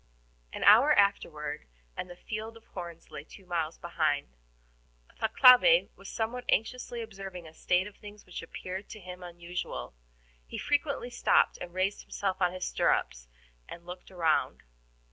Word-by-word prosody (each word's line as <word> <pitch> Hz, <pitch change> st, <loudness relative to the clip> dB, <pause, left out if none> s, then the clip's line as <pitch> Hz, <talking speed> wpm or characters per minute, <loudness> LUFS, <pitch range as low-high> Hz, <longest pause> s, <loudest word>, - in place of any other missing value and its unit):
An -, -, -5 dB
hour 230 Hz, +9 st, +8 dB
afterward 155 Hz, -, +1 dB, 0.3 s
and 180 Hz, -, -5 dB
the 175 Hz, -, -9 dB
field 220 Hz, +4 st, -6 dB
of 225 Hz, -, -19 dB
horns 170 Hz, -3 st, -9 dB
lay 145 Hz, -, -7 dB
two 190 Hz, +4 st, -15 dB
miles 165 Hz, -3 st, -2 dB
behind. 155 Hz, -4 st, -1 dB, 0.9 s
Thalcave 255 Hz, -, +7 dB
was -, -, -11 dB
somewhat 235 Hz, +2 st, -3 dB
anxiously 240 Hz, +1 st, 0 dB
observing 195 Hz, -5 st, -8 dB
a 155 Hz, -, -13 dB
state 180 Hz, +3 st, +1 dB
of 205 Hz, 0 st, -11 dB
things 210 Hz, 0 st, -12 dB
which 180 Hz, -, -7 dB
appeared 185 Hz, +3 st, -7 dB
to 215 Hz, -, -9 dB
him 180 Hz, -1 st, -9 dB
unusual. 175 Hz, -, -6 dB, 0.5 s
He -, -, -6 dB
frequently 285 Hz, -4 st, -1 dB
stopped -, -, +3 dB
and 175 Hz, -, -7 dB
raised 185 Hz, +3 st, -1 dB
himself 190 Hz, -2 st, -3 dB
on 180 Hz, -1 st, +3 dB
his 185 Hz, 0 st, -4 dB
stirrups -, -, 0 dB, 0.4 s
and 170 Hz, -, -10 dB
looked 180 Hz, +1 st, -9 dB
around. 170 Hz, -4 st, 0 dB
185 Hz, 150 wpm, -30 LUFS, 170-220 Hz, 0.9 s, hour